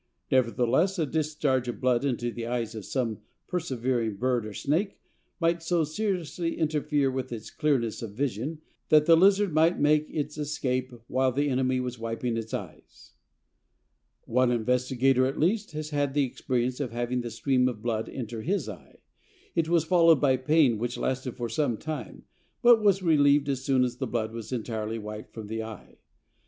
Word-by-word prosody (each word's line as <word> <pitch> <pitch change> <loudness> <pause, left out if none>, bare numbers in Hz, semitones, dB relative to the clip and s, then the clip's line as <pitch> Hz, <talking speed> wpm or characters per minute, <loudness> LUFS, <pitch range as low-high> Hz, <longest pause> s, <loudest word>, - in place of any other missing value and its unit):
Nevertheless 130 - +2
a 160 - +1
discharge 150 -4 0
of 120 - -4
blood 125 -1 +2
into 120 -3 -1
the 115 0 -5
eyes 120 -2 -2
of 110 -3 -7
some 115 -5 -2 0.3
persevering 125 - -1
bird 120 0 0
or 105 - -8
snake 175 +8 -1 0.4
might 170 0 +1
so 165 0 +1
seriously 170 0 -2
interfere 150 -3 +1
with 130 -1 -4
its 115 -2 -7
clearness 135 -8 0
of 115 - -5
vision 140 +4 -2 0.3
that 150 -1 +6
the 165 - +7
lizard 195 +1 +4
might 160 +3 +3
make 150 +1 +3
its 150 0 -4
escape 130 -3 -2
while 130 +1 +1
the 145 +3 0
enemy 130 0 +1
was 125 -1 -4
wiping 115 +1 -2
its 115 -1 -4
eyes." - - -8 1.1
One 125 +1 +2
investigator, 125 +2 +2
at 135 - -4
least, 200 +3 +1
has 155 0 -5
had 145 -1 0
the 145 - +3
experience 125 0 -2
of 140 -4 -2
having 120 +1 -2
the 120 - -5
stream 125 +2 +1
of 110 -4 -4
blood 115 -2 -1
enter 115 -3 -5
his 195 - -1
eye. - - -11 0.5
It 165 -2 0
was 170 -2 +3
followed 165 -4 +5
by 135 -1 +3
pain 130 -3 +3
which 120 +1 -3
lasted 130 -1 -2
for 120 -2 -2
some 120 0 0
time, 150 -6 -6 0.4
but 240 -2 +7
was 195 -2 +3
relieved 145 -3 +4
as 135 -2 -2
soon 135 -2 +3
as 125 -1 -2
the - - -3
blood 110 -2 -2
was 115 0 -7
entirely 110 -2 -3
wiped 105 0 -7
from 110 -2 -8
the 110 +2 -4
eye. 110 -2 -10
130 Hz, 175 wpm, -27 LUFS, 120-155 Hz, 1.1 s, the